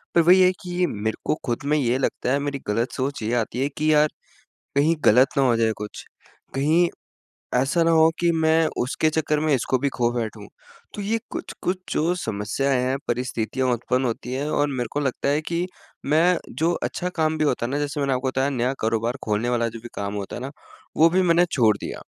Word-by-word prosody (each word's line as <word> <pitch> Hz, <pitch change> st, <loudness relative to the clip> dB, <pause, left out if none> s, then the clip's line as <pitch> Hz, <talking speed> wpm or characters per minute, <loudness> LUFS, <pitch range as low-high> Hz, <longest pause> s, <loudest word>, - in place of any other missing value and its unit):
पर 170 Hz, -, +7 dB
वही 180 Hz, +3 st, +6 dB
है 185 Hz, 0 st, +6 dB
कि 180 Hz, -, -8 dB
ये 180 Hz, -, +4 dB
मेरे 110 Hz, +1 st, -2 dB
को -, -, +1 dB
ख़ुद 120 Hz, +2 st, -2 dB
में 150 Hz, +1 st, +2 dB
ये 125 Hz, -2 st, +1 dB
लगता 130 Hz, -1 st, -1 dB
है 140 Hz, -, +2 dB
मेरी 140 Hz, -1 st, -3 dB
गलत 115 Hz, +4 st, 0 dB
सोच 135 Hz, -1 st, -3 dB
ये 115 Hz, +3 st, -1 dB
आती 120 Hz, +1 st, -1 dB
है 140 Hz, -, +2 dB
कि 155 Hz, +1 st, +2 dB
यार 150 Hz, 0 st, +5 dB, 0.7 s
कहीं 155 Hz, +4 st, +4 dB
गलत 125 Hz, +5 st, +6 dB
ना 135 Hz, -, +4 dB
हो 120 Hz, -2 st, +3 dB
जाए 110 Hz, -1 st, +2 dB
कुछ? 105 Hz, 0 st, -7 dB, 0.5 s
कहीं 160 Hz, +6 st, +3 dB, 0.7 s
ऐसा 140 Hz, +7 st, +2 dB
ना 165 Hz, -, +3 dB
हो 160 Hz, 0 st, +6 dB
कि 170 Hz, 0 st, +3 dB
मैं 160 Hz, 0 st, +3 dB
उसके 145 Hz, +5 st, +1 dB
चक्कर 155 Hz, -1 st, 0 dB
में 155 Hz, -1 st, +1 dB
इसको 130 Hz, 0 st, +1 dB
भी 140 Hz, -, 0 dB
खो 120 Hz, -1 st, +2 dB
बैठूँ? 110 Hz, -3 st, -4 dB, 0.5 s
तो 205 Hz, -, -5 dB
ये 225 Hz, +3 st, 0 dB
कुछ-कुछ 185 Hz, +1 st, -3 dB, 0.2 s
जो 165 Hz, +3 st, +1 dB
समस्याएँ 125 Hz, +6 st, 0 dB
हैं, 130 Hz, +2 st, 0 dB
परिस्थितियाँ 125 Hz, +1 st, -1 dB
उत्पन्न 125 Hz, +2 st, -1 dB
होती 125 Hz, +1 st, -3 dB
है 145 Hz, +3 st, -2 dB
और 145 Hz, 0 st, +2 dB
मेरे 120 Hz, -2 st, -1 dB
को 145 Hz, -, 0 dB
लगता 140 Hz, 0 st, -1 dB
है 150 Hz, +2 st, +1 dB
कि 170 Hz, +2 st, -2 dB, 0.4 s
मैं 165 Hz, +5 st, +3 dB, 0.2 s
जो 165 Hz, +2 st, +3 dB
अच्छा 180 Hz, -, -2 dB
काम 155 Hz, -1 st, +1 dB
भी 155 Hz, -, +1 dB
होता 125 Hz, -4 st, 0 dB
है 125 Hz, -, -4 dB
ना 145 Hz, -, -1 dB
जैसे 145 Hz, 0 st, -3 dB
मैंने 140 Hz, -1 st, +1 dB
आपको 130 Hz, +1 st, -1 dB
बताया 130 Hz, +2 st, 0 dB
नया 130 Hz, 0 st, 0 dB
कारोबार 115 Hz, +3 st, 0 dB
खोलने 110 Hz, +3 st, 0 dB
वाला 120 Hz, -1 st, +1 dB
जो 115 Hz, +1 st, -9 dB
भी 120 Hz, -, -8 dB
काम 100 Hz, 0 st, -3 dB
होता 100 Hz, -1 st, -5 dB
है 120 Hz, -, -6 dB
ना 135 Hz, +2 st, -5 dB, 0.5 s
वो 165 Hz, +1 st, +6 dB
भी 185 Hz, +2 st, +2 dB
मैंने 175 Hz, 0 st, +4 dB
छोड़ 110 Hz, -6 st, +3 dB
दिया। -, -, -7 dB
135 Hz, 220 wpm, -23 LUFS, 120-155 Hz, 0.7 s, पर